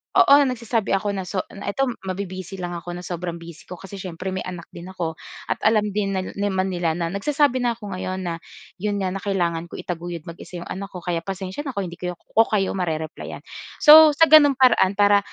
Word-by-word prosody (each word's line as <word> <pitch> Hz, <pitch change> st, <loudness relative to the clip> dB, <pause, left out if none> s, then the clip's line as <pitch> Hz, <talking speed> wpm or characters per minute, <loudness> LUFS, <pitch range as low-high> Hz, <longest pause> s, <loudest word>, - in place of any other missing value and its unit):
Oo, -, -, +7 dB
nagsasabi 230 Hz, -5 st, -1 dB
ako 200 Hz, +1 st, -1 dB
na, 190 Hz, -2 st, -4 dB
so 185 Hz, +1 st, -2 dB
na 200 Hz, -, -9 dB
ito 205 Hz, +7 st, 0 dB, 0.2 s
mabi-busy 185 Hz, 0 st, -5 dB
lang 180 Hz, -2 st, -5 dB
ako, 175 Hz, 0 st, -6 dB
na 180 Hz, -, -7 dB
sobrang 175 Hz, -1 st, -4 dB
busy 170 Hz, -2 st, -12 dB
ko 180 Hz, -, -7 dB
kasi 195 Hz, +1 st, -10 dB
siyempre, 185 Hz, +1 st, -5 dB
may 185 Hz, -, -3 dB
anak 180 Hz, -2 st, -6 dB
din 175 Hz, +2 st, -10 dB
ako. 170 Hz, -4 st, -5 dB, 0.3 s
At -, -, -1 dB
alam 215 Hz, -1 st, +2 dB
din 200 Hz, -1 st, -1 dB
nil 185 Hz, -1 st, -3 dB
naman 190 Hz, -2 st, 0 dB
nila 175 Hz, -3 st, -1 dB
na 170 Hz, 0 st, -2 dB
nagsasabi 275 Hz, +5 st, +1 dB
na 240 Hz, -2 st, 0 dB
'ko 210 Hz, -3 st, -9 dB
ngayon 185 Hz, 0 st, -4 dB
na, 170 Hz, -1 st, -3 dB, 0.4 s
‘yon 205 Hz, +2 st, -1 dB
nga, 190 Hz, -2 st, -1 dB
na 195 Hz, -, -4 dB
kailangan 175 Hz, -4 st, -1 dB
ko -, -, -10 dB
itaguyod 170 Hz, -2 st, -5 dB
mag-isa 170 Hz, +2 st, -10 dB
‘yong -, -, -9 dB
anak 195 Hz, +1 st, -5 dB
ko. 180 Hz, -3 st, -10 dB
Kaya, 175 Hz, -2 st, -1 dB
pasensya 190 Hz, -, -5 dB
na 265 Hz, -, -5 dB
kung 200 Hz, -, -1 dB
hindi 170 Hz, -, -11 dB
kayo 180 Hz, -1 st, -4 dB
ko 225 Hz, +6 st, +1 dB
kayo 200 Hz, -3 st, 0 dB
mare-replyan. 160 Hz, -4 st, -4 dB, 0.4 s
So, 305 Hz, 0 st, +9 dB
sa 325 Hz, -, +5 dB
gano’n 290 Hz, -3 st, +8 dB
paraan, 245 Hz, -7 st, +4 dB
para 205 Hz, 0 st, +5 dB
190 Hz, 220 wpm, -23 LUFS, 175-205 Hz, 0.4 s, So